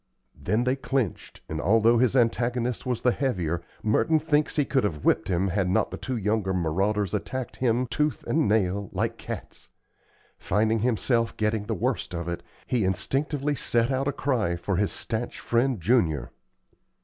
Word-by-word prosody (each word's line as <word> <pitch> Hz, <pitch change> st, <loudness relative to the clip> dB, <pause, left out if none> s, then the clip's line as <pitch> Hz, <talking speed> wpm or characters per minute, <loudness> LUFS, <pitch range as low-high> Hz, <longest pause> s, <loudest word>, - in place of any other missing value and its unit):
Then 110 Hz, +5 st, 0 dB
they 125 Hz, +1 st, +1 dB
clinched, 135 Hz, -, -3 dB
and, 80 Hz, -1 st, -3 dB
although 115 Hz, +6 st, +4 dB
his 125 Hz, +1 st, +2 dB
antagonist 120 Hz, 0 st, +1 dB
was 125 Hz, -2 st, -2 dB
the 125 Hz, -, +5 dB
heavier, 90 Hz, -, -1 dB, 0.2 s
Merton 110 Hz, +9 st, +3 dB
thinks 150 Hz, 0 st, +1 dB
he 145 Hz, -3 st, +2 dB
could 135 Hz, -1 st, +1 dB
have 80 Hz, -8 st, -2 dB
whipped -, -, +3 dB
him 95 Hz, +1 st, +1 dB
had 95 Hz, 0 st, 0 dB
not 95 Hz, -, +1 dB
the -, -, -5 dB
two 130 Hz, -2 st, -3 dB
younger 105 Hz, -2 st, 0 dB
marauders 95 Hz, +4 st, 0 dB
attacked 130 Hz, -2 st, -3 dB
him, 125 Hz, 0 st, +1 dB
tooth 150 Hz, +5 st, -1 dB
and 160 Hz, -7 st, +1 dB
nail, 100 Hz, -2 st, +1 dB
like -, -, -1 dB
cats. -, -, -8 dB, 0.7 s
Finding 110 Hz, +3 st, +1 dB
himself 115 Hz, 0 st, +1 dB
getting 105 Hz, -1 st, 0 dB
the 110 Hz, -, -1 dB
worst 90 Hz, -1 st, -2 dB
of 85 Hz, 0 st, -4 dB
it, 85 Hz, 0 st, -3 dB, 0.2 s
he 120 Hz, -4 st, 0 dB
instinctively 140 Hz, -, 0 dB
sent 120 Hz, -2 st, +1 dB
out 135 Hz, +1 st, 0 dB
a -, -, +2 dB
cry 120 Hz, -12 st, 0 dB
for 85 Hz, +2 st, -2 dB
his 100 Hz, +1 st, +1 dB
stanch 115 Hz, +2 st, -4 dB
friend 120 Hz, 0 st, +1 dB
Junior. 80 Hz, -, +1 dB
115 Hz, 170 wpm, -26 LUFS, 95-130 Hz, 0.7 s, the